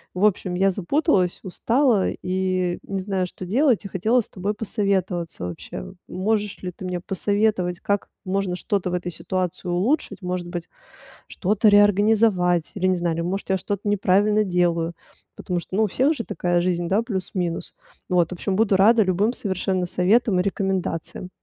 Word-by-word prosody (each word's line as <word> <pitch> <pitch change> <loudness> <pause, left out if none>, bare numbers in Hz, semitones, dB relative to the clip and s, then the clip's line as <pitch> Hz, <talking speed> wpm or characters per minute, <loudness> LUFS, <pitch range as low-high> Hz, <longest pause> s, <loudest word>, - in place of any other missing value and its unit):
В 195 +3 +2
общем, 185 -3 +1
я 195 +1 +3
запуталась, 200 - +1
устала 230 +3 +2
и 185 -1 -1
не 195 -1 -4
знаю, 190 -1 -1
что 185 - -9
делать 240 - +2
и - - -5
хотела 220 +6 +2
с - - -12
тобой 200 +3 -3
посоветоваться 190 - -2
вообще. 85 -8 -7
Можешь 205 +2 -1
ли 180 - -3
ты 185 - -10
мне 180 -1 -2
посоветовать, 195 -1 0
как 200 0 -1 0.2
можно 190 -1 -1
что-то 195 -2 -1
в - - 0
этой 175 0 -3
ситуации 180 +2 -3
улучшить, 210 - 0
может 180 -1 -3
быть, 175 -1 -5 0.6
что-то 210 +3 +1
реорганизовать 205 -4 +4
или, 185 -2 0
не 185 - +2
знаю, 170 -1 -1
или - - -2
может 190 +3 -3
я 190 - +3
что-то 205 +2 -3
неправильно 205 +2 +3
делаю, 170 -2 +1 0.4
потому 180 -2 -2
что, 185 - -6
ну, 220 - +4
у - - +3
всех 270 - +2
же 230 - -5
такая 175 -4 0
жизнь, 175 -1 0
да, 205 +4 +2
плюс-минус. 185 -5 -3 0.3
Вот, 175 -2 +2
в - - -8
общем, 190 +2 -2
буду 205 -3 +3
рада 220 +3 +5
любым 195 +5 +1
совершенно 190 -2 -1
советам 190 +2 +2
и - - +3
рекомендациям. 185 -2 -2
190 Hz, 170 wpm, -23 LUFS, 180-205 Hz, 0.6 s, рада